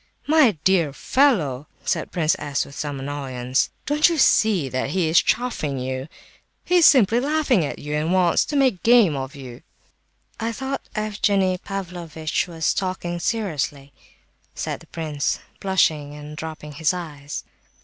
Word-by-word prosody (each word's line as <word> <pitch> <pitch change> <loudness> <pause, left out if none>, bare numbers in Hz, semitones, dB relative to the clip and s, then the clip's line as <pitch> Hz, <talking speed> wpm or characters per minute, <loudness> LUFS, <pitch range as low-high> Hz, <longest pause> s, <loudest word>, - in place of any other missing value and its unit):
"My 290 - +4
dear 170 -7 +3
fellow!" 155 - +1 0.2
cried - - -1
Prince 165 0 +1
S., 145 -1 -2
with 140 - -13
some 145 -1 -4
annoyance, 135 -2 -2 0.2
"don't 300 +4 +4
you 335 - -1
see 210 - +3
that 130 +1 -2
he 175 +2 0
is 160 +2 +5
chaffing 190 - -1
you? 130 +1 -4 0.6
He 360 - +3
is 340 - +8
simply 235 -4 +5
laughing 280 - +2
at 145 - -4
you, 150 0 -6
and 155 +3 0
wants 180 -2 +3
to 295 - -4
make 260 -9 +2
game 230 -9 +5
of 135 0 -5
you." 130 -3 -10 0.8
"I 230 0 -2
thought 265 +3 -5
Evgenie 200 -3 +1
Pavlovitch 175 -6 -4
was 165 -2 0
talking 185 -2 -3
seriously," 150 - -2 0.6
said - - -3
the - - -17
prince, 155 -4 -2 0.2
blushing 155 -7 +1
and 150 +1 -9
dropping 155 -1 -7
his 155 +4 0
eyes. 145 -5 -6
165 Hz, 150 wpm, -23 LUFS, 145-215 Hz, 0.8 s, is